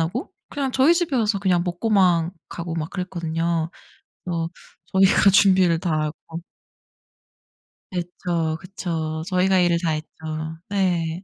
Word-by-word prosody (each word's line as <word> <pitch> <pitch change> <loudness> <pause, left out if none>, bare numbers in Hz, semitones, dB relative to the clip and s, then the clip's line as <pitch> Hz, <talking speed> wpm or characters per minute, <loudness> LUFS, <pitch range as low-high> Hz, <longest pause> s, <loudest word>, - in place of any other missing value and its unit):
하고 180 - -2 0.2
그냥 275 -2 -2
저희 270 +7 +5
집에 340 -5 0
와서 215 -3 +1
그냥 185 -3 +2
먹고만 175 -2 +2 0.2
가고 170 -1 -5
막 160 -1 -3
그랬거든요, 170 -2 -2 0.6
어 165 -2 -1 0.4
저희가 195 +1 +5
준비를 185 -4 +5
다 175 -1 -2
하고. 160 +2 -6 1.5
그쵸, 175 -2 -2
그쵸. 165 -4 -4
저희가 185 0 +2
일을 175 -1 +3
다 165 - +1
했죠. 155 0 -3 0.6
네. 180 -3 0
175 Hz, 245 characters per minute, -23 LUFS, 165-195 Hz, 1.5 s, 저희